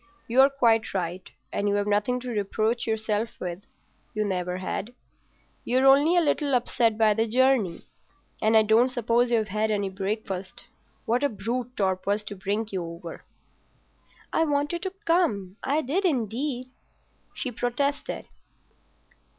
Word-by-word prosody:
You're 265 +4 +6
quite 230 -6 +2
right, 180 0 -3 0.2
and 205 0 0
you've 205 0 +1
nothing 210 +5 +1
to 250 - -6
reproach 220 +2 -1
yourself 220 0 -1
with—you 185 +3 -7
never 180 -2 -2
had. 210 +5 -4 0.7
You're 255 +2 +2
only 285 +6 +6
a - - +6
little 290 -3 +1
upset 235 -2 +1
by 220 -1 +4
the 225 +2 0
journey, 245 -6 +2 0.6
and 220 +1 +4
I 220 - +6
don't 225 +4 +4
suppose 240 -1 +1
you've 220 -3 +1
had 215 +2 0
any 205 -2 0
breakfast. 195 -1 -4 0.4
What 245 +4 +1
a 285 - +3
brute 240 +4 -4
Torp 190 -2 0
was 205 +1 +1
to 205 - -7
bring 205 +3 -2
you 185 -3 -2
over." 170 0 -8 1.1
"I 325 - +3
wanted 295 +2 0
to 380 0 -4
come. 215 - +1
I 290 +3 +1
did 325 +10 0
indeed," 255 - -1 0.6
she 255 - -3
protested. 250 +5 -2
225 Hz, 140 wpm, -26 LUFS, 205-255 Hz, 1.1 s, You're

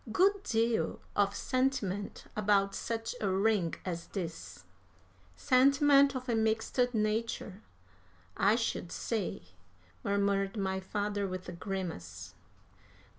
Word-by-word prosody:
Good 390 - +3
deal 230 - 0 0.2
of 200 0 +2
sentiment 240 -8 -1
about 200 -1 +2
such 225 +1 -3
a 200 - +1
ring 190 -2 +2
as 170 -2 -4
this." 165 - -6 0.7
"Sentiment 275 - +5
of 255 0 -4
a 240 - +1
mixed 220 +2 0 0.2
nature, 215 -2 -1 0.7
I 205 +3 +4
should 225 -7 -2
say," 220 - -3 0.6
murmured 200 0 +1
my 190 -1 -1
father, 205 +1 -2
with 185 0 -6
a - - -4
grimace. 165 - -5
205 Hz, 110 wpm, -31 LUFS, 190-230 Hz, 0.7 s, Sentiment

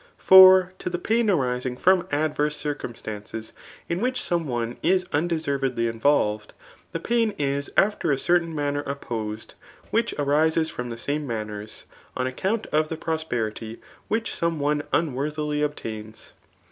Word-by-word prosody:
For 185 -1 +8
to - - -3
the 175 - -2
pain 225 +3 +1
arising 125 -7 0
from 185 +4 +3
adverse 150 0 0
circumstances 110 -6 -6 0.3
jn 170 - -1
which 250 +3 0
some 170 -3 -1
one; 120 -2 -3
i$ - - 0
unde^ 180 -3 +1
servediy 135 -7 -1
invcflv^d, 105 -7 +2 0.4
the 165 - -3
pain 230 +2 0
is 140 0 -1
after 200 -4 +2
a 140 - +2
certain 170 +2 +1
m^pef 145 -1 -1
opposed, 110 -6 -5 0.4
which 230 +1 +1
arises 155 +3 +2
from 125 0 -5
the 115 - -6
same 145 +4 -3
manners,. 105 -2 -5 0.3
on 125 - 0
account 190 - -1
of 155 0 +2
the 160 - -4
pi; 165 - -4
Ofi; 160 0 -4
perity 110 -1 -3 0.3
which 225 +1 -1
some 170 -2 -1
one 145 +1 +1
unworthily 150 0 -1
obtains. 110 -7 -5
150 Hz, 150 wpm, -24 LUFS, 125-170 Hz, 0.4 s, For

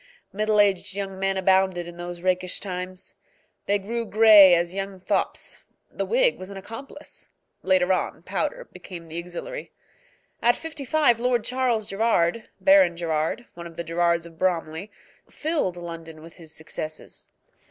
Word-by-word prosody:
Middle 215 +1 +1
aged 195 -1 +2
young 195 -1 -4
men 195 0 0
abounded 190 -2 +2
in 175 0 -10
those 175 0 -7
rakish 185 -1 0
times. 185 -1 -6 0.5
They 205 - +3
grew 230 +4 -3
gray 210 -4 +8
as 170 +1 0
young 195 -1 -4
fops. 185 - -2 0.3
The - - -3
wig - - +3
was 185 - -8
an 200 - -8
accomplice: 270 +9 -10 0.3
later 185 0 +3
on, - - -2
powder - - -3
became 170 -3 -10
the 165 +2 -4
auxiliary. 180 - -7 0.7
At 240 +1 +4
fifty 320 -3 -7
five 285 -5 +3
Lord 245 -2 +1
Charles 250 -4 0
Gerrard, 215 -1 +1
Baron 285 -12 +5
Gerrard, 165 +7 -1
one 170 0 -8
of 165 - -13
the 170 - -3
Gerrards 170 0 +1
of 165 -1 -14
Bromley, 170 0 -1 0.4
filled 295 - -1
London 165 -2 -8
with 165 0 -12
his 165 -3 -12
successes. 155 -1 -7
190 Hz, 155 wpm, -25 LUFS, 170-225 Hz, 0.7 s, gray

